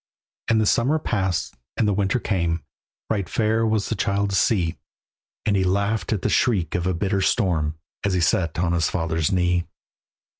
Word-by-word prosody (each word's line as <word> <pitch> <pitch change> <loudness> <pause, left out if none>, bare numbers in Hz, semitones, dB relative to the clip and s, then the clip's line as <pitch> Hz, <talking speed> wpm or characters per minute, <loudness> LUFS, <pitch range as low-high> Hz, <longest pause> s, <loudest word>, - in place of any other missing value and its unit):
And 115 -2 +3
the 110 - +2
summer 130 +9 +2
passed, 95 - -1 0.2
and 110 - +2
the 105 - +2
winter 100 +4 +1
came; 85 -6 -1 0.5
Right 100 -5 -1
fair 110 0 +1
was 110 -2 0
the - - 0
child 100 0 0
to - - 0
see, 85 -2 +1 0.7
And 105 - +2
he 95 - +2
laughed 100 +1 0
at 105 -5 -1
the - - +2
shriek 95 - +1
of 90 0 -1
a 95 - 0
bitter 95 +2 0
storm 85 -8 +1 0.3
As 100 -2 +1
he - - +2
sat 85 -1 +1
on 85 0 +1
his 85 -2 +1
father's 80 -2 -1
knee. 90 -2 +1
95 Hz, 185 wpm, -23 LUFS, 85-105 Hz, 0.7 s, And